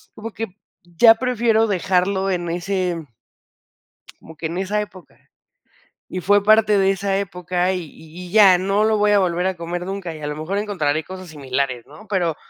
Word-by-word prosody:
como 225 +1 -7
que 225 - -4 0.4
ya 225 +7 +5
prefiero 230 -2 +1
dejarlo 190 0 0
en 175 -2 -2
ese 180 -2 -2 1.2
como 160 - -13
que 165 - -6
en 170 +3 -3
esa 205 +2 -1
época. 190 -3 -11 0.9
Y 185 - -4
fue 205 +2 +3
parte 215 -1 +4
de 195 0 +3
esa 195 0 -1
época 180 -1 -2
y 180 -2 -3
y 160 +4 -12
y - - -13
ya, 200 -4 +7
no 195 +3 +1
lo 220 0 +2
voy 210 0 +3
a 205 - +5
volver 180 -1 0
a 190 - -2
comer 175 +1 -5
nunca, 190 -4 -5
y 155 - -11
a - - -5
lo 150 - -4
mejor 165 +6 -3
encontraré 160 -8 -1
cosas 185 -2 -10
similares, 135 -4 -3
¿no?, 155 +9 -15
pero 175 -6 0
185 Hz, 185 wpm, -21 LUFS, 170-205 Hz, 1.2 s, ya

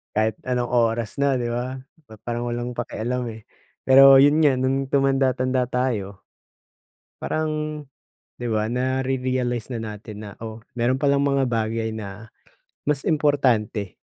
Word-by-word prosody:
Kahit 110 +1 +1
anong 125 -1 -1
oras 115 -2 +1
na, 140 -1 +2
'di 120 - -2
ba? 125 +2 -3 0.3
Pa 110 - -13
parang 120 0 -3
walang 120 0 -4
pakialam, 125 +2 -3
eh. 110 0 -12 0.4
Pero 135 0 +8
'yon 145 +2 +5
nga, 140 -3 +5
no'ng 135 +1 0
tumanda-tanda 130 -2 +1
tayo 115 -6 -2 1.0
parang, 155 0 -1 0.9
'di 120 - -4
ba, 110 -1 0
nare-realize 130 -2 -1
na 115 - -3
natin 105 0 -8
na, 105 - -8
"Oh, 110 0 -8 0.2
mayro'n 130 +4 +1
palang 140 -1 +3
mga 135 -2 +1
bagay 110 0 -1
na 110 0 -8 0.5
mas 145 -2 -1
importante 125 - +1
125 Hz, 135 wpm, -23 LUFS, 110-135 Hz, 1.0 s, Pero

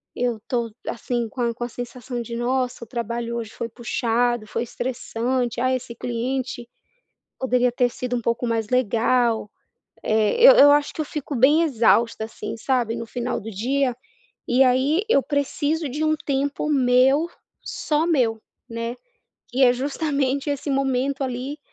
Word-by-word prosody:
Eu 240 -2 -1
tô 235 -2 -1 0.2
assim, 235 0 -2
com 255 - -11
a 235 -1 +1
com 240 - -6
a 240 - -3
sensação 245 +1 -6
de 235 0 -6
"Nossa, 250 0 -1
o - - -10
trabalho 235 0 -3
hoje 225 -2 -5
foi 230 - -5
puxado, 240 0 0
foi 230 - -2
estressante, 245 0 -2
ah, 255 0 +2
esse 245 -2 -4
cliente 245 +1 -3 0.7
poderia 250 -1 +2
ter 245 0 +2
sido 250 0 -3
um - - -1
pouco 235 +1 -1
mais 225 -2 -1
legal". 235 -2 +1 0.5
Eh 215 -1 +2
eu - - +12
eu 285 -7 +8
acho 290 0 +2
que - - -13
eu 305 - -3
fico 295 -1 -5
bem 290 +7 +5
exausta, 230 -5 +2
assim, 220 0 -7
sabe, 240 -2 0
no 230 -1 -5
final 245 +2 -3
do 225 - -7
dia, 250 +5 0 0.5
e 250 +2 +4
aí 265 +9 +3
eu 275 - +5
preciso 290 +2 -1
de 295 +4 -2
um 310 0 +3
tempo 280 +2 -1
meu, 265 +3 +4 0.4
só 305 +2 -1
meu, 240 -9 +1 0.3
né. 230 +1 -4 0.5
Que 260 +2 0
é 245 - +6
justamente 280 +1 -1
esse 285 +1 -3
momento 275 0 0
ali, 260 +4 -4
250 Hz, 165 wpm, -23 LUFS, 235-275 Hz, 0.7 s, eu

